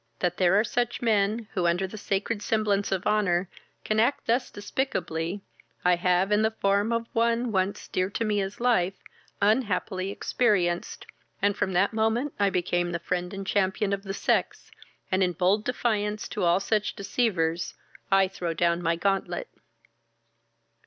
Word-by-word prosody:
That 175 +4 -1
there 185 +2 +4
are - - +3
such 240 +1 -1
men, 215 0 +1
who, 180 -4 +1
under 175 +3 +1
the 190 - -8
sacred 205 +1 -2
semblance 210 -2 0
of 190 -1 -1
honour, 195 -4 +2 0.4
can 215 0 +1
act 245 +6 +2
thus 240 +3 +1
despicably, 190 -6 -3 0.4
I 180 0 +5
have, 180 +2 +1
in 210 +1 +4
the 220 - +3
form 200 0 +1
of 230 0 0
one 235 +1 +1
once 190 0 -1
dear 185 +1 -1
to 225 +3 -2
me 210 -1 +1
as 195 +1 -5
life, 195 -7 +2 0.5
unhappily 200 -3 +1
experienced, 195 -5 0 0.3
and 205 0 +2
from 190 - -1
that 195 +5 +2
moment 225 +6 0
I 200 -1 +4
became 175 -1 0
the - - 0
friend 180 +1 -3
and 195 0 -6
champion 195 +1 +1
of 200 - -2
the 195 -1 -5
sex, - - -1 0.4
and 190 +1 +2
in 180 -1 +2
bold 190 +6 +1
defiance 210 -4 -1
to 200 - -1
all 170 +2 +4
such 210 +1 0
deceivers, 180 -6 -1 0.3
I 195 -1 +4
throw 175 -3 -4
down 170 +1 +1
my 165 -1 +1
gauntlet." 195 - -1
200 Hz, 165 wpm, -27 LUFS, 180-215 Hz, 0.5 s, I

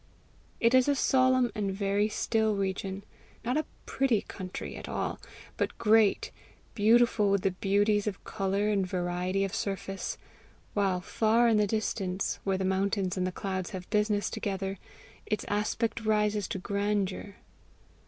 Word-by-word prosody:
It 230 +1 +3
is 255 0 +5
a 285 - +3
solemn 255 -2 +3
and 205 -3 -1
very 200 +2 +1
still 220 0 +1
region 195 0 -3 0.4
not 250 +2 0
a 310 - 0 0.2
PRETTY 260 -6 +1
country 185 -2 -7
at - - -8
all, - - -2 0.4
but - - -1
great 220 -2 +3 0.4
beautiful 225 -1 +4
with 195 -1 +2
the 195 - +2
beauties 205 +2 +1
of 200 -2 -4
colour 200 0 -1
and 200 -2 +2
variety 180 +1 -1
of 195 - -2
surface; 195 -1 -3 0.6
while, 195 -3 +1
far 225 +5 +2
in 225 -2 +4
the 210 -1 +3
distance, 195 -3 -1
where 195 -1 0
the 190 - -1
mountains 190 0 0
and 185 -1 0
the - - -2
clouds 185 -1 -3
have 180 - -10
business 210 -1 +1
together, 195 -1 -3 0.5
its 210 - -1
aspect 220 +2 -1
rises 210 -1 +1
to - - -3
grandeur. 200 0 -2
205 Hz, 150 wpm, -29 LUFS, 190-215 Hz, 0.6 s, is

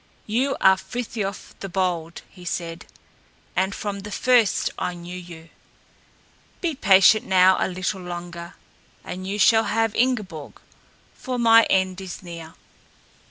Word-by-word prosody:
"You 255 +6 0
are 190 0 +5
Frithiof 200 -1 -5
the 195 - -6
Bold," 175 -3 -2
he 180 - -16
said, 170 -1 -5 0.7
"and 190 +1 0
from 200 -1 -4
the 205 +1 -8
first 235 0 +2
I 180 - -2
knew 175 +1 -9
you. 170 -2 -10 1.1
Be 340 -3 -1
patient 200 -4 +5
now 185 0 +5
a - - +1
little 185 +1 -3
longer 175 0 -7 0.5
and 185 +1 -7
you 200 +2 -3
shall 220 +3 +5
have 225 -1 0
Ingeborg, 210 - -2 0.5
for 255 -1 -5
my 230 -1 +6
end 190 0 +1
is 185 -1 -8
near." 165 -2 -9
190 Hz, 135 wpm, -23 LUFS, 175-220 Hz, 1.1 s, my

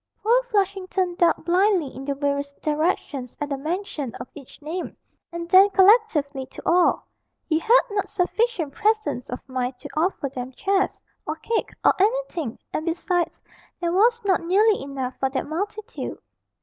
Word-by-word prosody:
Poor 470 +4 +4
Flushington 385 -3 0
ducked 345 -1 +2
blindly 360 -4 +2
in 265 +1 -7
the 280 0 -1
various 280 0 -1
directions 295 -4 -2
at 290 - -3
the 280 - -1
mention 310 - -4
of - - -7
each 275 -3 -13
name, 325 +4 -5 0.3
and 340 0 -5
then 380 +3 +7
collectively 375 - +3
to - - -11
all; 350 +1 +3 0.4
he 315 -1 +2
had 465 +8 +5
not 405 -1 -1
sufficient 365 - 0
presence 430 - 0
of 250 - -7
mind 255 -1 -3
to 285 - -9
offer 320 -2 0
them 255 -1 -6
chairs, 390 +6 0 0.3
or - - -1
cake, 460 -1 -2 0.2
or - - +7
anything, 395 - 0 0.2
and 310 - -1
besides, 345 0 -1 0.4
there 345 -1 -1
was 460 +5 +4
not 380 -3 +3
nearly 405 +5 +3
enough 270 -2 -4
for 265 - +1
that 265 0 -2
multitude. 415 +8 -5
345 Hz, 160 wpm, -24 LUFS, 280-400 Hz, 0.4 s, then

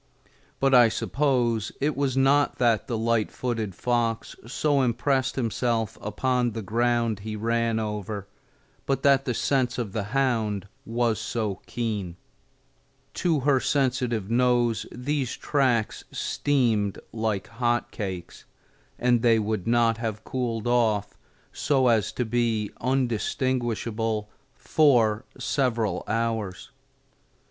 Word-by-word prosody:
But 135 0 +2
I 120 -2 +7
suppose 120 -4 0
it 150 +1 0
was 135 -1 0
not 140 +2 +3
that 115 -3 +2
the 120 - -2
light 115 -1 +1
footed 115 -6 -3
fox 120 0 -1
so 145 +2 +1
impressed 130 +2 +1
himself 115 -3 -1
upon 120 +3 0
the 110 0 -5
ground 115 +1 +1
he 110 +2 -5
ran 115 +1 0
over, 105 -2 -4 0.6
but 135 -1 0
that 135 -1 +4
the 125 - -1
sense 130 -2 +1
of 115 -5 -3
the 105 -3 -2
hound 110 -5 0 0.2
was 115 -1 0
so 105 -4 -3
keen. 105 -7 -3 1.0
To 165 -5 +1
her 135 0 +3
sensitive 125 -7 0
nose 120 -2 +2
these 130 0 -2
tracks 125 -6 0
steamed 115 -8 0 0.2
like 110 -3 -1
hot 120 0 -1
cakes, 95 -5 -6 0.5
and 120 -1 +2
they 115 -1 +4
would 110 -2 -2
not 115 -1 +3
have 110 -2 -4
cooled 120 -4 -3
off 110 -4 +1 0.4
so 135 -3 +2
as 110 -3 +2
to 125 - -1
be 115 -2 0
undistinguishable 120 -3 -1 0.2
for 120 -7 +3
several 115 -9 0
hours. 110 -4 -2
115 Hz, 120 wpm, -26 LUFS, 110-130 Hz, 1.0 s, I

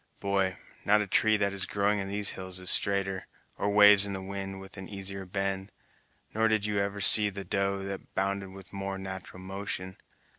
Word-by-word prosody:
Boy, 95 -1 -1 0.3
not 105 +1 +3
a - - -2
tree 110 +2 +2
that 100 -1 -1
is 100 -1 -3
growing 105 +1 0
in 95 - -4
these 100 +1 -1
hills 95 -1 -5
is 90 - +3
straighter, 95 -1 +1 0.3
or 100 - 0
waves 105 -1 +8
in 100 -1 +1
the 95 - -5
wind 95 0 -6
with 95 0 -11
an 95 -1 -9
easier 95 -1 -6
bend, 95 +1 -3 0.6
nor 110 +1 +2
did 110 -2 0
you 105 -1 -1
ever 100 0 -2
see 105 +1 +7
the 100 0 -7
doe 100 +1 -1
that 100 0 -8
bounded 95 0 -2
with 95 0 -13
a - - -8
more 95 0 -4
nat'ral 95 -1 -8
motion. 95 -1 -5
100 Hz, 200 wpm, -28 LUFS, 95-100 Hz, 0.6 s, waves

